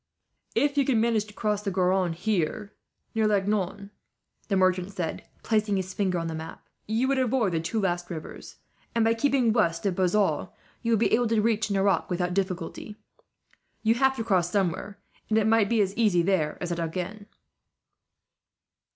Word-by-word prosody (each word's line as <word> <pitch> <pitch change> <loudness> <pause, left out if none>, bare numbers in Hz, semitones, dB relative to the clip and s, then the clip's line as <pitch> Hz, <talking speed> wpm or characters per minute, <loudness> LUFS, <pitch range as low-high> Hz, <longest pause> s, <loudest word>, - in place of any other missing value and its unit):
"If 285 0 +2
you 275 - +3
can 250 -4 +2
manage 225 -2 +1
to 210 - -14
cross 210 0 -1
the 205 - -2
Garonne 185 -1 +1
here, 200 +2 -2 0.4
near 220 -1 +2
Langon," 200 -1 -1 0.6
the 200 - 0
merchant 185 0 +2
said, 180 -5 -4 0.2
placing 215 -2 +1
his 190 -1 -3
finger 190 -3 0
on 165 - -2
the 165 - -3
map, 160 +1 -8 0.2
"you 225 +4 +1
would 275 0 +1
avoid 245 -5 +1
the 165 - 0
two 170 +8 -2
last 175 -3 -1
rivers 160 -3 -8 0.4
and, 230 -1 +3
by 225 - +4
keeping 250 -2 +2
west 170 -6 +1
of 195 - +2
Bazas, 190 +3 +1 0.3
you 230 - -1
would - - +4
be 230 - +2
able 240 +1 +3
to 225 -1 +2
reach 220 0 +1
Nerac 195 -3 +1
without 180 0 -1
difficulty. 195 +2 -3 0.9
You 225 0 +4
have 265 +2 +2
to 225 - -3
cross 185 -6 +1
somewhere, 200 +1 -1 0.3
and 220 - +2
it 220 - +3
might 220 -2 +3
be 230 -2 +3
as 195 0 -1
easy 205 -7 +3
there 165 -5 0
as 175 - -4
at 170 - -2
Agen." 185 +5 -4
200 Hz, 180 wpm, -26 LUFS, 180-220 Hz, 0.9 s, by